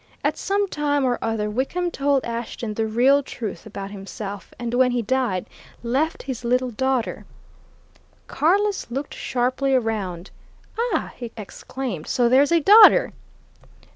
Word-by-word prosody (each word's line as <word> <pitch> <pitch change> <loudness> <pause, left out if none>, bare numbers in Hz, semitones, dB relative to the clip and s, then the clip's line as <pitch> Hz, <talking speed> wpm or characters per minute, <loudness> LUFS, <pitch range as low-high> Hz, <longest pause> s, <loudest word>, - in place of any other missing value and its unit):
At - - +1
some 400 +1 0
time 290 -4 0
or 245 -1 0
other, 225 -2 -1
Wickham 275 +11 -2
told 280 -2 +1
Ashton 235 -1 -4
the 220 +1 -1
real 255 +6 +4
truth 220 -8 -7
about 200 -1 -7
himself, 200 -1 -7
and 240 -1 -4
when 250 +1 +4
he 245 -1 -1
died, 235 -6 0 0.4
left 270 +7 -1
his 260 -3 -5
little 250 +1 +1
daughter 260 +1 -1 0.5
" - - -33
Carless 395 - +1
looked 275 +4 -4
sharply 260 +2 0
round. 200 -7 -2 0.6
"Ah!" - - -2
he 240 -2 -7
exclaimed. 215 -2 -6
"So 245 -1 +2
there's 270 +5 +4
a 335 -1 +4
daughter?" 430 +7 +7
250 Hz, 140 wpm, -23 LUFS, 220-280 Hz, 0.6 s, daughter